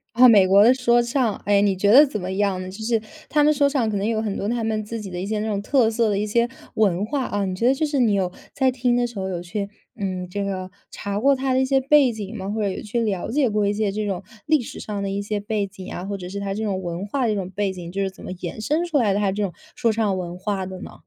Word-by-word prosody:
啊， 250 Hz, +1 st, +8 dB
美 205 Hz, -5 st, +7 dB
国 195 Hz, +2 st, +6 dB
的 245 Hz, +4 st, +7 dB
说 240 Hz, -2 st, +3 dB
唱， 235 Hz, -2 st, 0 dB
诶， 200 Hz, 0 st, +4 dB
你 200 Hz, -2 st, +2 dB
觉 200 Hz, +2 st, +2 dB
得 285 Hz, +6 st, +9 dB
怎 220 Hz, -6 st, -4 dB
么 185 Hz, 0 st, -4 dB
样 195 Hz, -2 st, 0 dB
呢？ 185 Hz, -, -6 dB
就 205 Hz, +4 st, -8 dB
是 225 Hz, 0 st, +1 dB, 0.3 s
它 295 Hz, -1 st, +3 dB
们 305 Hz, +1 st, +5 dB
说 285 Hz, 0 st, +3 dB
唱 270 Hz, -6 st, 0 dB
可 205 Hz, -, -1 dB
能 200 Hz, +2 st, -1 dB
有 220 Hz, -1 st, 0 dB
很 210 Hz, -3 st, -2 dB
多 200 Hz, -, -3 dB
它 235 Hz, -1 st, -1 dB
们 220 Hz, -1 st, -1 dB
自 225 Hz, +2 st, -5 dB
己 195 Hz, -3 st, -7 dB
的 175 Hz, -, -4 dB
一 -, -, -3 dB
些 215 Hz, 0 st, -1 dB
那 215 Hz, -, -2 dB
种 205 Hz, -2 st, -1 dB
特 235 Hz, -1 st, +3 dB
色 225 Hz, -1 st, +1 dB
的 200 Hz, -, 0 dB
一 210 Hz, -, 0 dB
些 235 Hz, +3 st, +1 dB, 0.3 s
文 200 Hz, -2 st, +2 dB
化 265 Hz, +2 st, -2 dB
啊， 205 Hz, -1 st, -1 dB
你 185 Hz, -, -2 dB
觉 230 Hz, +6 st, +1 dB
得 265 Hz, -, +5 dB
就 310 Hz, +3 st, 0 dB
是 290 Hz, -3 st, -1 dB
你 225 Hz, -4 st, +3 dB
有 185 Hz, -2 st, 0 dB, 0.2 s
在 265 Hz, -2 st, +2 dB
听 245 Hz, -1 st, +1 dB
的 245 Hz, 0 st, +2 dB
时 235 Hz, -4 st, -6 dB
候 190 Hz, 0 st, -3 dB
有 175 Hz, -2 st, -3 dB
去， 200 Hz, +2 st, -4 dB, 0.3 s
嗯， 185 Hz, -4 st, -3 dB
这 200 Hz, +3 st, -3 dB
个 185 Hz, -2 st, -4 dB, 0.2 s
查 200 Hz, 0 st, -4 dB
过 275 Hz, +4 st, +4 dB
它 265 Hz, 0 st, -1 dB
的 260 Hz, -, +3 dB
一 -, -, +2 dB
些 270 Hz, 0 st, +3 dB
背 275 Hz, -2 st, +5 dB
景 215 Hz, -1 st, -6 dB
吗？ 195 Hz, -2 st, -5 dB
或 215 Hz, +1 st, -2 dB
者 200 Hz, -, +1 dB
有 190 Hz, -, -4 dB
去 230 Hz, +2 st, -2 dB
了 200 Hz, -5 st, -1 dB
解 275 Hz, +2 st, +2 dB
过 210 Hz, -1 st, +1 dB
一 205 Hz, -, +1 dB
些 210 Hz, -1 st, 0 dB
这 210 Hz, +1 st, -2 dB
种 190 Hz, -1 st, -3 dB, 0.2 s
历 310 Hz, -1 st, +4 dB
史 -, -, -8 dB
上 205 Hz, -2 st, -4 dB
的 195 Hz, -, -2 dB
一 200 Hz, +1 st, -2 dB
些 205 Hz, 0 st, -2 dB
背 205 Hz, -1 st, -2 dB
景 190 Hz, -1 st, -10 dB
啊， 175 Hz, -, -5 dB
或 200 Hz, 0 st, -3 dB
者 180 Hz, -1 st, -7 dB
是 200 Hz, +1 st, -5 dB
它 195 Hz, -1 st, -3 dB
这 220 Hz, -, -3 dB
种 195 Hz, -3 st, -1 dB
文 175 Hz, +2 st, -4 dB
化 260 Hz, +5 st, -1 dB
的 -, -, +1 dB
这 215 Hz, -, +1 dB
种 190 Hz, -2 st, -3 dB
背 200 Hz, 0 st, -1 dB
景， 175 Hz, -2 st, -8 dB
就 195 Hz, +2 st, -2 dB
是 195 Hz, -, 0 dB
怎 190 Hz, -, -15 dB
么 -, -, -6 dB
延 180 Hz, +4 st, -6 dB
伸 305 Hz, +10 st, 0 dB
出 330 Hz, -4 st, 0 dB
来 220 Hz, -7 st, +3 dB
的， 200 Hz, -, 0 dB
它 200 Hz, -2 st, +1 dB
这 205 Hz, +1 st, -2 dB
种 185 Hz, -, -2 dB, 0.2 s
说 235 Hz, -6 st, +2 dB
唱 210 Hz, -4 st, 0 dB
文 175 Hz, -1 st, -5 dB
化 195 Hz, -1 st, -2 dB
的 185 Hz, 0 st, -7 dB
呢？ -, -, -8 dB
210 Hz, 340 characters per minute, -23 LUFS, 195-235 Hz, 0.3 s, 得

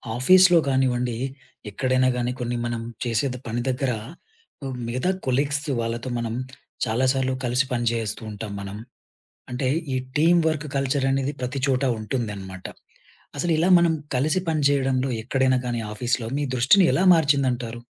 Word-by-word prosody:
ఆఫీస్‌లో 180 Hz, +6 st, +6 dB
గానివ్వండి, 125 Hz, -3 st, +1 dB, 0.5 s
ఎక్కడైనా 130 Hz, +4 st, +1 dB
గానీ 120 Hz, 0 st, -1 dB
కొన్ని 120 Hz, 0 st, -2 dB
మనం 120 Hz, -1 st, -3 dB, 0.2 s
చేసేది 125 Hz, +2 st, -1 dB
పని 115 Hz, +1 st, -2 dB
దగ్గర 130 Hz, 0 st, 0 dB, 1.0 s
మిగతా 125 Hz, +8 st, -1 dB, 0.2 s
కొలీగ్స్ 140 Hz, +3 st, +1 dB, 0.2 s
వాళ్ళతో 115 Hz, +2 st, -3 dB
మనం 115 Hz, -1 st, -3 dB, 0.5 s
చాలా 115 Hz, +4 st, 0 dB
సార్లు 130 Hz, -1 st, 0 dB
కలిసి 125 Hz, +3 st, +1 dB
పని 120 Hz, -1 st, -1 dB
జేస్తూ 115 Hz, -2 st, -3 dB
ఉంటాం 105 Hz, 0 st, -6 dB
మనం. 100 Hz, +1 st, -7 dB, 0.7 s
అంటే 125 Hz, +2 st, -1 dB, 0.3 s
ఈ -, -, 0 dB, 0.2 s
టీమ్ 170 Hz, +3 st, +5 dB
వర్క్ 155 Hz, -1 st, -1 dB
కల్చర్ 135 Hz, 0 st, 0 dB
అనేది 135 Hz, +1 st, 0 dB
ప్రతి 125 Hz, +2 st, -3 dB
చోట 130 Hz, 0 st, +1 dB, 0.2 s
ఉంటుందనమాట. 100 Hz, -5 st, -5 dB, 0.7 s
అసలిలా 165 Hz, +2 st, +1 dB
మనం 170 Hz, -1 st, +3 dB, 0.2 s
కలిసి 150 Hz, +7 st, +1 dB
పనిజేయడంలో 135 Hz, -4 st, +1 dB
ఎక్కడైనా 130 Hz, +1 st, +2 dB
గానీ, 120 Hz, -1 st, -2 dB
ఆఫీస్‌లో 120 Hz, +1 st, -1 dB
మీ 145 Hz, -, -1 dB
దృష్టిని 130 Hz, +11 st, +5 dB
ఎలా 185 Hz, -, +2 dB
మార్చిందంటారు? 130 Hz, -7 st, +1 dB
130 Hz, 135 wpm, -24 LUFS, 120-140 Hz, 1.0 s, ఆఫీస్‌లో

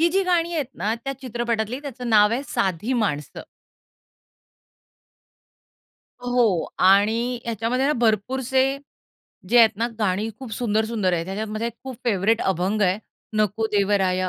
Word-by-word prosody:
ही 335 Hz, -, +5 dB
जी 390 Hz, +1 st, +3 dB
गाणी 345 Hz, -2 st, +1 dB
आहेत 300 Hz, -5 st, -1 dB
ना, 215 Hz, +2 st, -1 dB
त्या 275 Hz, -, -2 dB
चित्रपटातली 240 Hz, -1 st, -2 dB
त्याचं 260 Hz, -4 st, -6 dB
नाव 210 Hz, -1 st, +6 dB
आहे, 260 Hz, +4 st, -1 dB
साधी 190 Hz, +6 st, -1 dB
माणसं. 150 Hz, -6 st, -4 dB, 2.8 s
हो 245 Hz, -8 st, +2 dB
आणि 220 Hz, +6 st, +3 dB
ह्याच्यामध्ये 235 Hz, +3 st, -1 dB
ना, 295 Hz, -, +3 dB
भरपूरसे 245 Hz, +2 st, +1 dB, 0.9 s
जे 240 Hz, +4 st, +5 dB
आहेत 225 Hz, -3 st, +6 dB
ना, 230 Hz, +3 st, 0 dB
गाणी 210 Hz, +1 st, 0 dB
खूप 260 Hz, -4 st, -8 dB
सुंदर-सुंदर 220 Hz, -3 st, 0 dB
आहेत. 165 Hz, -1 st, 0 dB
ह्याच्यात 200 Hz, +3 st, -3 dB
माझा 215 Hz, +2 st, -3 dB
एक 235 Hz, -, -5 dB
खूप 260 Hz, -2 st, -6 dB
फेव्हरेट 225 Hz, 0 st, +2 dB
अभंग 190 Hz, +3 st, 0 dB
आहे. 185 Hz, 0 st, +2 dB, 0.4 s
नको 215 Hz, +1 st, +1 dB
देवराया 190 Hz, -2 st, +1 dB
220 Hz, 140 wpm, -23 LUFS, 200-245 Hz, 2.8 s, नाव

